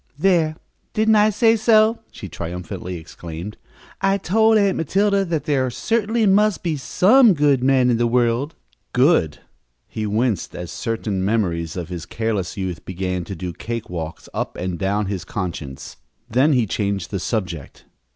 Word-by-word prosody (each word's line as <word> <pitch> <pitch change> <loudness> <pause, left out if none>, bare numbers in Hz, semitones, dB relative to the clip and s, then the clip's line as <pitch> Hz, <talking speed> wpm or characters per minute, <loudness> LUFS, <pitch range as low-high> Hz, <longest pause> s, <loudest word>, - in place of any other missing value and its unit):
"There, 160 -2 +2 0.4
didn't 220 0 +3
I 210 +1 +5
say 225 +2 +3
so!" 220 0 +4
she 100 - -8
triumphantly 90 +1 -6
exclaimed. 85 +4 -8 0.5
"I 195 0 +2
told 220 +4 +3
Aunt 200 -2 +2
Matilda 200 +5 +2
that 165 -4 -2
there 135 -3 +1
certainly 225 - 0
must 205 +1 +3
be 165 -3 0
some 210 - +4
good 145 -4 +2
men 130 -2 +4
in 115 - +2
the 120 0 +2
world!" 120 +5 +1 0.4
Good! 125 - +3 0.5
He 110 -1 -4
winced 110 -2 -1
as 90 -1 -6
certain 110 -4 -2
memories 90 -6 -1
of 85 -1 -5
his 85 -2 -6
careless 110 -5 -2
youth 95 -3 -4
began 90 -1 -3
to 95 - -6
do 90 0 -5
cake 115 +4 -6
walks 80 -2 -6
up - - -3
and 90 -2 -3
down 100 +3 0
his 95 -3 -3
conscience. 75 -8 -6 0.3
Then 130 +6 +3
he 125 -4 +3
changed 100 -3 -2
the 100 - -2
subject. 90 - -4
115 Hz, 160 wpm, -21 LUFS, -, 0.5 s, I